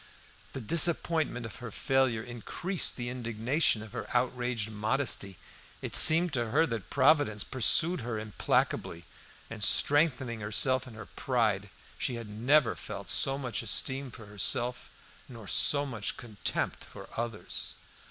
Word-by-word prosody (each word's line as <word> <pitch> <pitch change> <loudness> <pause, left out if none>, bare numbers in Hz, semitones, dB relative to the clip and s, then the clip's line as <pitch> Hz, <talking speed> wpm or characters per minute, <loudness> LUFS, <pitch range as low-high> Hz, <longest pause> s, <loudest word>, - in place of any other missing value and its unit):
The 135 - -6
disappointment 160 -2 +1
of 115 - -9
her 125 -1 -8
failure 130 -1 0
increased 125 - -3
the 120 -1 -4
indignation 120 +1 0
of 110 - -12
her 120 - -6
outraged 125 -3 -2
modesty; 110 -3 -1 0.4
it - - -4
seemed 165 +1 +7
to 120 -3 -1
her 155 +7 +3
that 115 - -5
Providence 140 -6 +3
pursued 140 - +3
her 115 -1 -4
implacably, 105 -5 -2 0.4
and, 115 -2 -4
strengthening 130 -3 +2
herself 125 +5 +1
in 115 - -11
her 105 -1 -9
pride, 110 -6 -1 0.3
she 125 - -2
had 115 -3 -8
never 125 +6 +2
felt - - -7
so 135 0 +1
much 125 -5 -3
esteem 135 0 -3
for 115 -2 -12
herself 120 +4 -1 0.4
nor 115 -5 -11
so 145 +9 +4
much 115 -7 -4
contempt 105 -7 -3
for - - -11
others. 115 -2 -3
120 Hz, 140 wpm, -29 LUFS, 110-135 Hz, 0.4 s, seemed